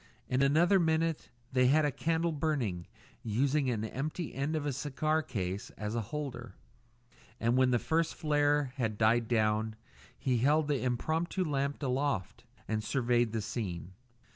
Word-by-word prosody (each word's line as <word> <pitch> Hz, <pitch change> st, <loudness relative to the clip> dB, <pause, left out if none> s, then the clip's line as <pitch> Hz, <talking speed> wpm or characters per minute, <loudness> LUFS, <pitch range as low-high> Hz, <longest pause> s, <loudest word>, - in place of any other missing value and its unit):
In 130 Hz, +1 st, +1 dB
another 165 Hz, +8 st, +4 dB
minute 165 Hz, -1 st, 0 dB, 0.2 s
they 125 Hz, -1 st, +4 dB
had 150 Hz, +3 st, +4 dB
a 145 Hz, -, +1 dB
candle 165 Hz, +4 st, 0 dB
burning, 140 Hz, -, -1 dB, 0.3 s
using 130 Hz, +5 st, +1 dB
an 110 Hz, -3 st, -1 dB
empty 150 Hz, +8 st, -4 dB
end 140 Hz, +4 st, -1 dB
of 150 Hz, -2 st, -2 dB
a 145 Hz, -, -1 dB
cigar 150 Hz, +4 st, 0 dB
case 95 Hz, -, -4 dB
as 105 Hz, 0 st, -3 dB
a 115 Hz, -, 0 dB
holder; 125 Hz, -1 st, -6 dB, 0.8 s
and 115 Hz, +1 st, +2 dB
when 130 Hz, 0 st, +4 dB
the 125 Hz, -, +3 dB
first 160 Hz, +6 st, 0 dB
flare 145 Hz, -3 st, +1 dB
had 110 Hz, -5 st, -1 dB
died 115 Hz, +1 st, +3 dB
down 110 Hz, -1 st, +1 dB, 0.4 s
he 125 Hz, -3 st, 0 dB
held 145 Hz, +4 st, +3 dB
the 145 Hz, -3 st, 0 dB
impromptu 160 Hz, +9 st, -1 dB
lamp 140 Hz, -1 st, -1 dB
aloft 130 Hz, -5 st, -1 dB, 0.2 s
and 110 Hz, -1 st, -1 dB
surveyed 120 Hz, -2 st, +1 dB
the 110 Hz, -1 st, -2 dB
scene. 95 Hz, -5 st, -4 dB
130 Hz, 155 wpm, -31 LUFS, 115-150 Hz, 0.8 s, another